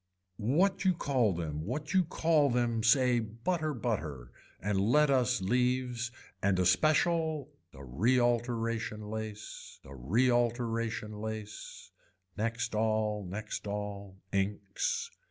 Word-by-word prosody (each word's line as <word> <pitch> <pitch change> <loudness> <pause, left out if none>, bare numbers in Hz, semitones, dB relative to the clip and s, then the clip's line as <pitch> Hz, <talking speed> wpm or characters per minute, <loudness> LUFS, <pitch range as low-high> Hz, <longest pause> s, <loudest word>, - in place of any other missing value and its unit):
What 185 - +2
you 185 -2 +3
call 130 -9 +2
them 80 -3 -3
what 145 - -4
you 190 -1 +5
call 160 -3 +2
them 120 -2 +1
say 125 +1 +4
butter 135 +9 -2
butter 80 - -3 0.3
and 100 -1 0
let 145 +8 +4
us 125 -3 +2
leaves 125 +2 0 0.3
and 100 -1 +2
a 90 - +2
special 155 - +2 0.2
a 70 - -12
realteration 115 - 0
lace 110 -1 -7
a 65 - -10
realteration 115 - 0
lace. 110 -1 -7 0.4
Next 115 +2 -2
all, 110 -1 +1
next 105 +3 -5
all, 100 -1 -5
inks. 105 - -1
115 Hz, 115 wpm, -31 LUFS, 105-130 Hz, 0.4 s, you